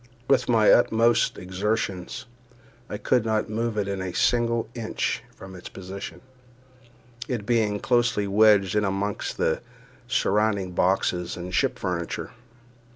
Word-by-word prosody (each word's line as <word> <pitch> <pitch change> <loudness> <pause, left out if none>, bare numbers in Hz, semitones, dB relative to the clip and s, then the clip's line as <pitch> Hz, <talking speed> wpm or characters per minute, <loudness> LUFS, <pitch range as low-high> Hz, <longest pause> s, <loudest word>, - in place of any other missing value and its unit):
With 135 -2 +2
my 110 -3 +5
utmost 115 0 +3
exertions 95 0 -3 0.6
I 105 - -4
could 120 +2 +1
not 110 -1 -1
move 115 0 -2
it 100 -1 0
a 95 -2 -3
single 115 -1 +2
inch 115 -2 -2
from 95 0 -11
its 90 - -9
position, 95 +1 -8 1.1
it 120 -6 -3
being 110 -3 +1
closely 115 -2 +1
wedged 100 -1 +4
in 105 - +2
among 100 +1 -1 0.2
the 80 - 0 0.5
surrounding 105 -4 +1
boxes 90 -1 0
and 90 +1 -6
ship - - +1
furniture. 85 -3 -3
105 Hz, 125 wpm, -25 LUFS, 95-115 Hz, 1.1 s, my